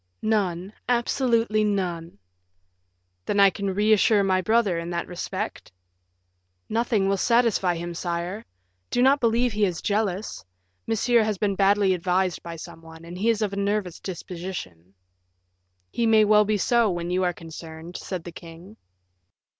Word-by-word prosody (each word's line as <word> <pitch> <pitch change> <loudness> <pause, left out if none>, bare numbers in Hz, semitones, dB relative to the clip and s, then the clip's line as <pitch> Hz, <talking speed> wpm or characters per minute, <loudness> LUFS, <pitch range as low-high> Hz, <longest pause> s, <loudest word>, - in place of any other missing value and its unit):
"None 195 -3 -1 0.2
absolutely 235 -3 +1
none." 180 - -2 1.1
"Then 200 - +1
I 200 -1 +7
can 200 -1 -3
reassure 210 0 +4
my 185 -1 +2
brother 215 -4 +2
in 170 +1 -5
that 170 -1 -2
respect?" 175 - -5 1.0
"Nothing 225 -3 0
will 195 0 +1
satisfy 230 -5 +2
him, 170 +1 -5
sire. 175 +5 -4 0.5
Do 245 - +1
not 275 +2 +5
believe 235 +1 +2
he 210 0 -1
is 180 -4 0
jealous. 205 -1 -2 0.4
Monsieur 230 +1 +3
has 215 -2 -1
been 200 +1 0
badly 195 0 +3
advised 180 0 0
by 170 -1 -7
some 165 0 -10
one, 160 0 -13
and 170 +1 -9
he 205 +6 0
is 225 -1 +1
of 205 - -1
nervous 200 -3 -2
disposition." 170 - -7 1.0
"He 235 - 0
may 220 -1 +5
well 210 0 +5
be 210 0 +1
so 235 +2 +2
when 175 -1 -3
you 185 +1 +1
are 180 - +2
concerned," 165 0 -10
said 185 -4 -5
the 175 - -8
king. 170 +5 -12
195 Hz, 150 wpm, -25 LUFS, 175-215 Hz, 1.1 s, I